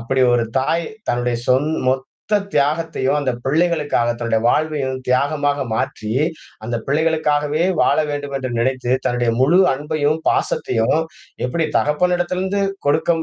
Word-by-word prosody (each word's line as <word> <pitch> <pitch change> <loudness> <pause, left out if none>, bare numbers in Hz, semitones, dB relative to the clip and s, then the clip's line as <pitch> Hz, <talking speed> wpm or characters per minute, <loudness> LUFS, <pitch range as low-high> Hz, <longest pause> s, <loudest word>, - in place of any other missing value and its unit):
அப்படி 130 +3 -1
ஒரு 120 -1 +2
தாய் 165 +5 0 0.2
தன்னுடைய 120 0 0
சொந் 130 +3 +3 0.2
மொத்த 135 +10 -1
தியாகத்தையும் 150 -1 +1
அந்தப் 130 -4 -2
பிள்ளைகளுக்காகத் 145 -6 +1
தன்னுடைய 115 -2 0
வாழ்வையும் 140 -2 0
தியாகமாக 145 +2 +1
மாற்றி, 110 0 -3 0.5
அந்தப் 115 0 -3
பிள்ளைகளுக்காகவே 150 0 +1 0.2
வாழ - - +3
வேண்டும் 145 -1 -4
என்று 130 -1 -4
நினைத்து, 130 0 0
தன்னுடைய 120 -1 +1
முழு 160 +8 +4 0.2
அன்பையும் 150 +1 -1
பாசத்தையும் 115 +4 +1 0.5
எப்பிடி 160 +5 -1
தகப்பனிடத்திலிருந்து 180 +5 0 0.2
கொடுக்கம் 160 +3 +2
145 Hz, 120 wpm, -19 LUFS, 125-155 Hz, 0.5 s, முழு